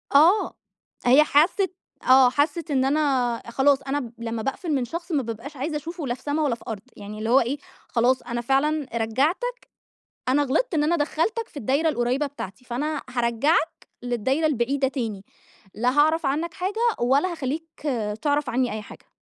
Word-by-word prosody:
آه، 340 Hz, +9 st, +5 dB, 0.5 s
هي 260 Hz, +5 st, +7 dB
حست 345 Hz, +6 st, +3 dB, 0.4 s
آه 260 Hz, -1 st, +8 dB
حست 300 Hz, +5 st, 0 dB
إن 265 Hz, -2 st, +2 dB
أنا 270 Hz, -5 st, +1 dB
خلاص 275 Hz, +3 st, +3 dB
أنا 275 Hz, +1 st, -2 dB
ب 240 Hz, -4 st, -7 dB
لمّا 230 Hz, -1 st, -4 dB
باقفل 315 Hz, -, -3 dB
من 260 Hz, -3 st, +1 dB
شخص 335 Hz, +8 st, -6 dB
ما 290 Hz, -4 st, +1 dB
بابقاش 235 Hz, +6 st, -7 dB
عايزة 300 Hz, +4 st, -2 dB
أشوفه 320 Hz, 0 st, -6 dB
لا 240 Hz, -, 0 dB
في 250 Hz, -, -11 dB
سما 295 Hz, +2 st, -1 dB
ولا 280 Hz, -6 st, +1 dB
في -, -, -17 dB
أرض، 220 Hz, -4 st, -4 dB, 0.2 s
يعني 210 Hz, +1 st, -8 dB
اللي 220 Hz, +1 st, -2 dB
هو 255 Hz, +3 st, +6 dB
إيه 255 Hz, +4 st, -1 dB, 0.3 s
خلاص 250 Hz, +2 st, +2 dB
أنا 240 Hz, 0 st, -4 dB
فعلًا 275 Hz, +4 st, +1 dB
رجعتك، 300 Hz, -, 0 dB, 0.7 s
أنا 275 Hz, +3 st, +3 dB
غلطت 325 Hz, -, 0 dB
إن 300 Hz, -2 st, +2 dB
أنا 325 Hz, +3 st, +2 dB
دخّلتك 340 Hz, +9 st, -1 dB
في -, -, -13 dB
الدايرة 285 Hz, +6 st, +1 dB
القريبة 255 Hz, +1 st, 0 dB
بتاعتي، 250 Hz, -5 st, -9 dB
فأنا 290 Hz, +5 st, -2 dB
هارجعك 245 Hz, +7 st, +1 dB, 0.2 s
للدايرة 245 Hz, +5 st, 0 dB
البعيدة 270 Hz, -1 st, +1 dB
تاني، 225 Hz, -7 st, -4 dB, 0.5 s
لا 245 Hz, +4 st, +1 dB
هاعرف 315 Hz, +2 st, +3 dB
عنك 300 Hz, +5 st, -1 dB
حاجة 395 Hz, +5 st, -3 dB, 0.2 s
ولا 275 Hz, +9 st, +3 dB
هاخلّيك 320 Hz, +1 st, -5 dB, 0.4 s
تعرف 290 Hz, -1 st, +1 dB
عني 250 Hz, +1 st, 0 dB
أي 215 Hz, 0 st, -4 dB
حاجة. -, -, -14 dB
275 Hz, 175 wpm, -24 LUFS, 245-310 Hz, 0.7 s, آه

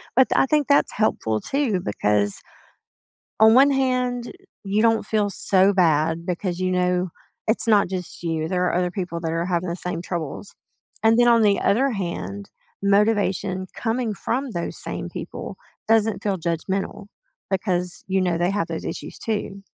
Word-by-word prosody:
but 260 Hz, +1 st, +6 dB
th -, -, +1 dB
I -, -, +5 dB
think 295 Hz, +1 st, +1 dB
that's 285 Hz, 0 st, +3 dB
helpful 110 Hz, -, 0 dB
too 265 Hz, -, 0 dB
because, 105 Hz, -, 0 dB, 1.0 s
on 220 Hz, 0 st, +7 dB
one 275 Hz, +3 st, +7 dB
hand, 250 Hz, -2 st, 0 dB, 0.3 s
you 205 Hz, +2 st, +1 dB
don't 225 Hz, -1 st, +2 dB
feel 210 Hz, -2 st, +1 dB
so 195 Hz, 0 st, +3 dB
bad 165 Hz, -2 st, +2 dB
because 180 Hz, 0 st, -2 dB
you 185 Hz, 0 st, 0 dB
know 180 Hz, 0 st, +1 dB, 0.4 s
it's 220 Hz, +2 st, +1 dB
not 210 Hz, -4 st, +4 dB
just 180 Hz, -2 st, -5 dB
you, 160 Hz, -2 st, -1 dB
there 180 Hz, 0 st, 0 dB
are -, -, 0 dB
other 180 Hz, 0 st, +1 dB
people 175 Hz, -3 st, -4 dB
that 165 Hz, -1 st, -2 dB
are 165 Hz, +1 st, -1 dB
having 175 Hz, -1 st, -1 dB
the 170 Hz, -, -3 dB
same 180 Hz, -2 st, -4 dB
troubles. 175 Hz, +2 st, -5 dB, 0.5 s
And 225 Hz, +1 st, +4 dB
then 240 Hz, 0 st, +5 dB
on 235 Hz, -1 st, +5 dB
the 205 Hz, -2 st, +3 dB
other 260 Hz, +7 st, +2 dB
hand, 100 Hz, -, -5 dB, 0.3 s
motivation 200 Hz, -2 st, +1 dB
coming 230 Hz, -1 st, -1 dB
from 260 Hz, +6 st, -2 dB
those 170 Hz, -5 st, -4 dB
same -, -, -5 dB
people -, -, -7 dB, 0.3 s
doesn't 220 Hz, -3 st, +2 dB
feel 200 Hz, -2 st, 0 dB
judgmental, 190 Hz, +4 st, -3 dB, 0.4 s
because 180 Hz, -2 st, -2 dB
you 190 Hz, 0 st, +1 dB
know 180 Hz, -2 st, +1 dB
they 175 Hz, +2 st, +1 dB
have 195 Hz, -4 st, -1 dB
those 165 Hz, -, -5 dB
issues -, -, -6 dB
too. 205 Hz, -3 st, -3 dB
190 Hz, 170 wpm, -23 LUFS, 175-225 Hz, 1.0 s, on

